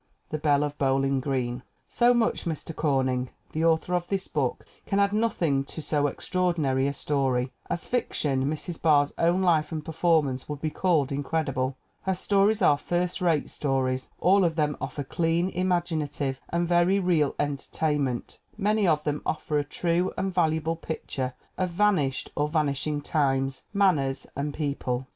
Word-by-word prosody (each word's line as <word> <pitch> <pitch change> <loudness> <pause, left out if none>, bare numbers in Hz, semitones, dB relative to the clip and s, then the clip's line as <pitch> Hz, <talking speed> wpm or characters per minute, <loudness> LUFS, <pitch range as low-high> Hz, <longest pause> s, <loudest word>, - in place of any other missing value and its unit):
The 155 - -2
Belle 145 -1 +3
of 145 0 -3
Bowling 135 0 +2
Green. 125 -2 -2 0.3
So 240 0 +4
much 240 -2 +1
Mr. 165 -1 -4
Corning. 130 -4 0 0.2
The 160 - -1
author 165 +2 +2
of 175 -1 0
this 195 -1 -2
book 135 -5 -2 0.2
can 200 - +1
add 200 0 +3
nothing 170 -11 +1
to 160 - -8
so 145 -1 +1
extraordinary 155 -5 0
a - - 0
story. 135 -3 0 0.2
As 175 - -3
fic 245 -2 -1
tion, 135 -3 +1
Mrs. 155 +3 -4
Barr's 145 -3 +4
own 175 +3 +3
life 160 -4 +2
and 155 -2 -4
performance 160 -5 +1
would 150 -1 -4
be 155 +1 -2
called 155 -7 +1
incredible. 135 -2 -1 0.2
Her 190 -1 0
stories 200 +2 +2
are 145 -4 +5
first 175 +2 -1
rate 165 -5 +1
stories; 130 -2 -1
all 190 +3 +4
of 165 -2 +1
them 150 -2 +1
offer 145 - -4
clean, 165 +5 0
imaginative 165 -7 -1
and 170 0 0
very 175 +3 +3
real 170 -6 +2
en 145 -1 0
tertainment; 140 -4 -2 0.2
many 210 -1 +2
of 155 -2 +2
them 150 -1 -1
offer 150 -1 -1
a - - 0
true 170 +4 0
and 190 0 -1
valuable 160 -2 +1
picture 135 -5 -4 0.2
of 185 -1 +1
vanished 170 -8 +1
or 150 0 0
vanishing 150 -1 0
times, 135 -3 0
manners 175 -10 +2
and 145 +2 -2
people. 135 -4 -2
155 Hz, 165 wpm, -27 LUFS, 140-175 Hz, 0.3 s, are